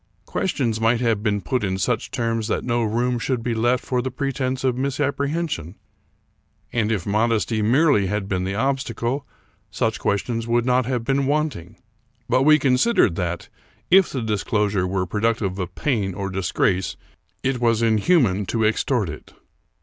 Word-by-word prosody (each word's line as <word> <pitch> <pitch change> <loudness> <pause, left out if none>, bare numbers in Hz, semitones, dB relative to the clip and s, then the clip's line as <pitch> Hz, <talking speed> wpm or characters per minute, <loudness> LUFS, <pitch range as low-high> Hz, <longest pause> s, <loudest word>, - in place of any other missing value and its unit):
Questions 120 - -1
might 115 +1 +3
have 115 -4 +1
been 105 -2 0
put 125 0 -1
in 95 -1 -1
such 115 +3 -1
terms 115 -3 -1
that - - -1
no 120 -1 0
room 120 +2 0
should 120 -1 -2
be 120 - -1
left 120 +3 +1
for 125 -2 0
the 130 - -3
pretense 130 -1 -2
of 130 -2 +1
misapprehension; 140 - -2 1.0
and, 115 -2 +1
if 100 -6 -1
modesty 110 +1 +1
merely 120 -2 +3
had 105 0 -2
been 95 -2 -1
the 95 +1 -2
obstacle, 130 +1 -1 0.4
such - - -1
questions 115 +3 -1
would 120 0 +1
not 125 -1 +2
have 125 -3 -1
been 135 +2 0
wanting; 140 - -1 0.5
but 130 - +2
we 155 +2 +6
considered 135 - +3
that, 85 -1 -3 0.4
if 190 0 +6
the 130 -4 -3
disclosure 105 -2 0
were 95 0 -1
productive 105 0 -1
of 90 0 -5
pain 105 - -1
or 100 -1 -4
disgrace, 95 0 0 0.5
it 130 -1 0
was 115 -1 +2
inhuman 110 - +2
to 110 -2 0
ex 110 - +1
tort 120 -8 0
it. 75 -1 -9
115 Hz, 165 wpm, -22 LUFS, 105-130 Hz, 1.0 s, we